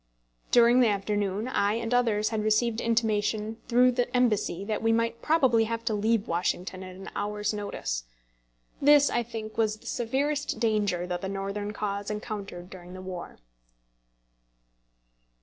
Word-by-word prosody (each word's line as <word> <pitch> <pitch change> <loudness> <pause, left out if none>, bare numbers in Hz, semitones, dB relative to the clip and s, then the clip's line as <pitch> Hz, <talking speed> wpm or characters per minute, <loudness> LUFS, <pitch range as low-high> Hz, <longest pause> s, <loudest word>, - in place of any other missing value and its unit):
During 240 +1 +6
the 245 - +5
afternoon 205 +1 -1
I 205 -5 +1
and 230 +1 -2
others 225 -4 +2
had 220 -1 -1
received 220 +2 +1
intimation 220 -1 0
through 250 +1 +5
the 245 0 0
embassy 210 -6 +1
that 215 0 -2
we 225 0 +2
might 230 0 0
probably 265 -8 +3
have 230 +1 -4
to 225 - +1
leave 215 +1 +1
Washington 180 +2 -2
at 185 -1 -9
an 190 +1 -9
hour's 210 +1 -2
notice. - - -4 0.8
This, 290 0 +6
I 240 - +1
think, 225 -2 -7
was 215 -1 +1
the - - -21
severest 280 +5 -1
danger 205 -6 +1
that 180 -1 -3
the 190 - -3
Northern 200 +1 -3
cause 205 -1 -3
encountered 210 -4 -5
during 180 -1 -10
the - - -8
war. 185 -2 -7
215 Hz, 150 wpm, -27 LUFS, 200-235 Hz, 0.8 s, During